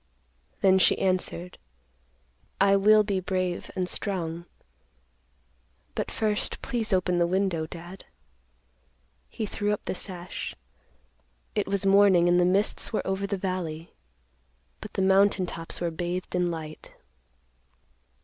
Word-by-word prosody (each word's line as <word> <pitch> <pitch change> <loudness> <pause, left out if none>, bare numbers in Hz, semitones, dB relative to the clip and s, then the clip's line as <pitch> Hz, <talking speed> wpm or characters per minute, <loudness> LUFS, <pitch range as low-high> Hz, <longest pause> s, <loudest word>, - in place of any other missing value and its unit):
Then 190 -1 +5
she - - +4
answered, 180 -1 -2 1.0
"I 195 0 +5
will 210 +2 +6
be 200 -2 -1
brave 185 -1 -2
and 185 -1 -1
strong. 170 -4 -3 1.5
But - - -3
first, 210 -1 -1
please 235 -5 -1
open 180 -2 +2
the 170 - +3
window, 180 -3 0
Dad." 175 +3 -10 1.2
He 220 - -4
threw 205 0 -2
up 210 - -3
the - - -2
sash. 185 -1 -5 1.0
It 210 - -1
was 200 0 0
morning, 195 -3 +5
and 175 0 +4
the 175 - +4
mists 195 +3 +1
were 220 - -1
over 195 +1 -1
the 200 - -2
valley, 175 -4 -4 0.9
but - - -9
the 190 - 0
mountain 195 0 +4
tops 165 -1 -5
were 170 -1 -1
bathed 175 +2 -4
in 180 -1 +1
light. 155 -2 -7
185 Hz, 130 wpm, -27 LUFS, 175-200 Hz, 1.5 s, will